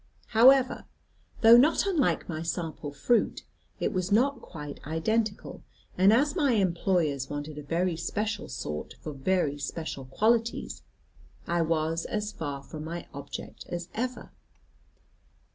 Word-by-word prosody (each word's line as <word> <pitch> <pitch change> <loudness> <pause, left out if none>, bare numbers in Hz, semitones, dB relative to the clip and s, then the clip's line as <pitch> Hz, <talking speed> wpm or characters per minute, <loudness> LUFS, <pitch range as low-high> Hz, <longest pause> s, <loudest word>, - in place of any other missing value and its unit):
However, 260 +3 +5 0.6
though 230 +1 +9
not 300 +9 +4
unlike 345 -9 +1
my 160 -3 -4
sample 165 -3 -4
fruit, 185 - +1 0.4
it - - -1
was 185 +1 -1
not 255 +5 +3
quite 150 -4 -8
identical, 205 +8 -1 0.3
and 190 +3 +5
as 285 +7 +3
my 285 -8 +3
employers 170 - +1
wanted 145 +1 -5
a - - -6
very 170 +4 0
special 210 +5 -3
sort 75 0 -5
for 155 - -5
very 145 0 0
special 140 -1 -5
qualities, 230 - 0 0.6
I 170 0 +1
was 165 0 0
as 210 0 -2
far 145 -6 -5
from 155 +2 -8
my 170 +2 -5
object 140 0 -8
as 175 0 -5
ever. 250 +3 -4
175 Hz, 130 wpm, -28 LUFS, 155-225 Hz, 0.6 s, though